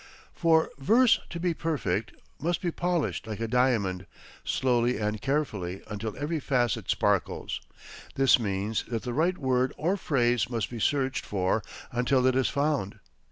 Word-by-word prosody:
For 160 -1 +3
verse, 230 - +5
to 170 - -5
be 175 0 +1
perfect, 115 - -2 0.3
must 170 +3 0
be 175 - -1
polished 175 -8 -1
like 110 -1 -5
a 115 - -1
diamond, 110 -7 +1 0.4
slowly 125 -1 +1
and 105 0 -2
carefully, 105 -11 -2
until 105 +1 -5
every 155 +3 -2
facet 125 -5 0
sparkles. - - 0 0.5
This 135 -1 +5
means 100 0 -1
that 115 -2 -3
the 125 - -3
right 170 +7 +1
word 130 -1 +1
or 180 +6 0
phrase 120 - +1
must 115 -4 -2
be 120 - -5
searched 135 +2 0
for 95 -2 0 0.3
until 125 +1 +2
it 130 -1 +3
is 130 -1 +2
found. 140 -8 -1
125 Hz, 155 wpm, -28 LUFS, 110-150 Hz, 0.5 s, verse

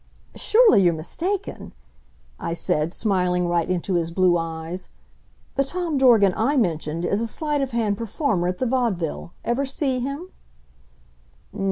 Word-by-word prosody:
"Surely 440 - +5
you're 175 -3 +3
mistaken," 365 - -4 0.7
I 165 - -3
said, 170 -2 0
smiling 180 -4 0
right 175 0 0
into 185 +1 -1
his 170 -2 0
blue 180 0 +3
eyes. 165 +2 -4 0.7
"The 275 - +4
Tom 340 +2 -3
Dorgan 225 -8 +5
I 275 +7 +1
mentioned 165 -6 0
is 200 +4 0
a 230 - -1
sleight 295 +3 -1
of 270 - -1
hand 220 -4 -1
performer 225 - -1
at 180 0 -2
the 255 - -1
Vaudeville. 225 - -1
Ever 265 +4 0
see 265 -1 -1
him?" 280 +8 -5
205 Hz, 145 wpm, -23 LUFS, 175-270 Hz, 0.7 s, Surely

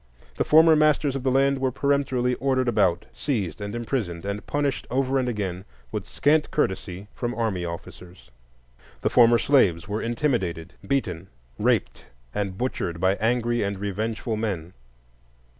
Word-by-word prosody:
The - - +2
former 160 +1 +6
masters 150 -2 +3
of 135 - -2
the 130 - +1
land 135 +1 +3
were 130 -1 0
peremptorily 135 -2 +1
ordered 130 -2 +1
about, 105 -7 +2
seized, 105 - -2
and 100 +2 -4
imprisoned, 110 -8 -3
and 100 +1 -3
punished 145 -2 -1
over 135 +1 +1
and 125 -1 0
again, 95 -5 -3 0.3
with - - -4
scant 150 +1 +2
courtesy 95 -6 -2
from 120 0 -3
army 105 -7 -1
officers. 85 -4 -9 0.7
The - - 0
former 120 -1 +6
slaves 100 - +3
were 105 +2 -2
intimidated, 115 - -1
beaten, 95 -9 -1 0.3
raped, - - 0 0.3
and 100 -2 -3
butchered 90 -9 -2
by 95 +2 +3
angry 120 +1 +1
and 100 -1 -2
revengeful 110 +3 -3
men. 95 -6 -3
115 Hz, 145 wpm, -25 LUFS, 95-135 Hz, 0.7 s, former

